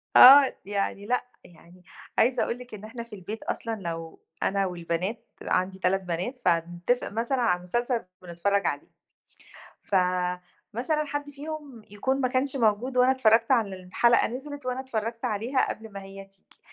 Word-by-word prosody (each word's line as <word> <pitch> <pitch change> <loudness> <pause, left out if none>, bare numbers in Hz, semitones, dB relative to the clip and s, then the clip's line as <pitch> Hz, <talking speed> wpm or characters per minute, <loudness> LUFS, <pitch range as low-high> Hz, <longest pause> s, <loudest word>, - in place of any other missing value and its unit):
آه 270 +1 +10
يعني 200 0 -2
لأ، 250 +3 0 0.2
يعني 175 +1 -18 0.3
عايزة 245 +2 +3
أقول 235 - -2
لِك 250 -2 -12
إن 205 - -8
إحنا 230 +1 -7
في 235 - -16
البيت 205 +4 -7
أصلًا 230 -1 -3
لو 165 -4 -6 0.2
أنا 195 0 +1
والبنات، 180 +4 -3 0.2
عندي 190 +1 0
3 190 +1 +1
بنات، 180 +9 -3
فنتفق 175 +6 0
مثلًا 235 +4 -1
على 220 -7 +3
المسلسل 235 +5 -2 0.2
ونتفرج 180 +2 0
عليه. 145 - -3 0.9
فمثلًا 185 - -1
حد 290 0 -4
فيهم 290 -4 -8
يكون 260 +7 -1
ما 255 - +3
كانش 260 +2 -1
موجود 240 +1 +1
وأنا 250 +1 +6
اتفرجت 230 -2 +3
على 220 -6 +2
ال 185 - -12
الحلقة 235 +6 +3
نزلت، 285 +3 -7
وأنا 255 +1 -2
اتفرجت 230 -1 -3
عليها 240 +4 0
قبل 220 0 -7
ما 195 0 -7
هي 195 0 -10
تيجي. 195 0 -24
220 Hz, 160 wpm, -27 LUFS, 185-250 Hz, 0.9 s, آه